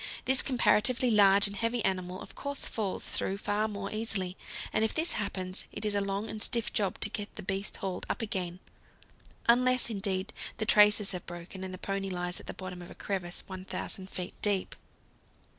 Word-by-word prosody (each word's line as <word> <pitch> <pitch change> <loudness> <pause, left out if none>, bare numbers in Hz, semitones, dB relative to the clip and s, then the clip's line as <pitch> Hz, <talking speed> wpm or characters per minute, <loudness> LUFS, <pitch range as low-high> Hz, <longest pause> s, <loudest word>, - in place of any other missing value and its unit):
This 265 0 +6
comparatively 245 0 +3
large 200 -1 +7
and 200 0 -1
heavy 230 +1 0
animal 185 -1 -1
of - - -12
course 280 -1 -4
falls 205 -4 -2
through 195 - -1
far 205 +1 0
more 200 -2 -5
easily, 210 -4 -2 0.4
and 215 - +3
if 220 - 0
this 320 +2 +2
happens, 185 -2 -2
it - - -5
is 210 - +3
a 200 - +2
long 200 +2 -2
and 215 - -6
stiff 235 0 +3
job 200 -3 0
to - - +1
get 205 -1 -4
the - - -7
beast 195 +1 -2
hauled 190 -3 -4
up - - -1
again 185 -6 -3 0.9
unless, 250 0 +4
indeed, 195 0 -1 0.2
the 215 - -1
traces 210 -1 +6
have 180 -2 -5
broken 175 +2 -7
and 190 - -4
the 185 - -6
pony 195 +1 -2
lies 180 -1 -3
at - - -13
the - - -4
bottom 185 -1 -7
of 175 - -10
a - - -11
crevasse 185 -3 -3
1,000 190 0 0
feet 180 -2 -5
deep. 200 -3 +1
200 Hz, 190 wpm, -30 LUFS, 185-220 Hz, 0.9 s, large